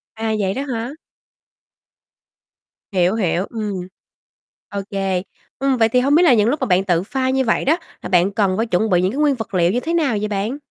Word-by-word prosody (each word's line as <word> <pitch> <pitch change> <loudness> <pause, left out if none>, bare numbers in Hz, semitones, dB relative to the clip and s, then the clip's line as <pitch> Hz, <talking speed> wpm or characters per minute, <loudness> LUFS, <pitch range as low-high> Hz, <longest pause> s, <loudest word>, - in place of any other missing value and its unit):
À, 220 0 -2
vậy 190 -2 0
đó 265 - -3
hả? 230 +1 -3 2.0
Hiểu, 185 +1 +2
hiểu, 185 -3 0
ừm. 205 -5 -4 0.8
Ô 200 - -3
kê, 195 -2 -1 0.4
ừm, 270 0 +1
vậy 225 -1 +3
thì 250 - +3
hông 275 +3 +3
biết 340 - +5
là 315 -7 +6
những 215 -1 +3
lúc 290 +4 0
mà 260 - 0
bạn 185 -1 +3
tự 175 -2 +1
pha 260 +5 -2
như 265 0 +1
vậy 230 - +1
đó, 310 +5 +3 0.2
là - - -6
bạn 180 +1 +3
cần 195 -2 +1
phải 225 - +1
chuẩn 220 0 0
bị 180 -2 +3
những 185 +1 +1
cái 270 - -4
nguyên 295 -2 +3
vật 225 -4 -7
liệu 175 -1 +3
như 240 - 0
thế 325 +6 -3
nào 295 -10 +1
vậy 210 - -1
bạn? 210 +5 -2
220 Hz, 225 wpm, -20 LUFS, 190-260 Hz, 2.0 s, là